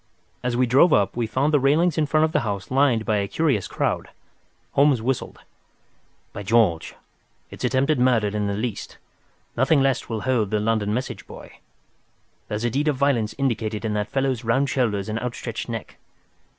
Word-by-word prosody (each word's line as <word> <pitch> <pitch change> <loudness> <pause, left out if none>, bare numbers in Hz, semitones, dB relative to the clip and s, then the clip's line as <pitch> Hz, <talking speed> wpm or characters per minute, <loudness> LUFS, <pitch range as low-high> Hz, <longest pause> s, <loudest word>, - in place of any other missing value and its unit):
As 125 -1 -1
we 130 - +3
drove 135 +8 +5
up, 100 -1 +2
we 120 -1 -1
found 135 +7 0
the 145 - +5
railings 150 +5 +2
in 155 -2 +1
front 155 +1 +2
of 160 - +1
the 150 - +2
house 100 -6 -4
lined 130 -5 +2
by 110 - +1
a 100 -1 -1
curious 135 - 0
crowd. - - -2 0.6
Holmes 140 -3 +3
whistled. 125 +3 -3 1.0
"By - - -6
George! 105 -6 +1 0.6
It's - - -9
attempted 135 +2 +1
murder 125 -4 +3
at 100 - -2
the 105 - -2 0.2
least. 110 +1 -5 0.6
Nothing 135 +5 +3
less 135 -2 0
will 110 -2 -3
hold 120 -5 0
the 105 0 0
London 105 -1 0
message 125 +4 -4
boy. - - -12 0.9
There's 105 +2 -3
a 120 - 0
deed 145 +5 0
of 150 - +2
violence 130 -6 0
indicated 115 -5 -2
in 110 - -1
that 105 0 -2
fellow's 135 -3 -1
round 135 +5 +1
shoulders 105 -7 0
and 110 +1 -2
outstretched 120 -1 -5
neck. 115 -2 -6
120 Hz, 180 wpm, -23 LUFS, 110-135 Hz, 1.0 s, drove